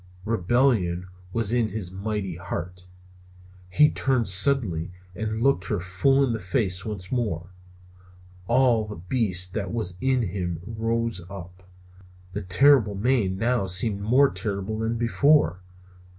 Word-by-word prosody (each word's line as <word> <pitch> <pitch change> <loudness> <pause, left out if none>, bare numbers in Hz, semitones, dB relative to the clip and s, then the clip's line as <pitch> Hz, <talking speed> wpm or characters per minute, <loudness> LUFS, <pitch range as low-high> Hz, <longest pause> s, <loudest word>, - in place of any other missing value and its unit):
Rebellion 110 -4 +1 0.3
was 115 +1 -1
in 120 -2 +2
his 100 -3 -5
mighty 95 -2 -4
heart. 90 0 -6 0.8
He 150 +11 +4
turned 130 -4 0
suddenly 95 -4 +2 0.3
and 110 +2 -3
looked 140 +1 +2
her 105 -6 -1
full 95 +10 +2
in 120 - -1
the 110 - -3
face 95 -1 -1
once 100 -4 -6
more. 95 -8 -2 1.0
All 120 -4 +3
the 105 - -7
beast 90 -1 0
that 100 -3 -3
was 105 -6 -3
in 130 -2 +1
him 90 -4 -3
rose 115 -2 -2
up. 90 -2 -10 0.7
The 100 +3 -4
terrible 105 +3 +4
mane 105 -3 +1
now 115 -2 0
seemed 100 +3 0
more 130 +7 +4
terrible 100 +2 -3
than 115 +1 -1
before. 120 - +3
105 Hz, 135 wpm, -25 LUFS, 90-120 Hz, 1.0 s, He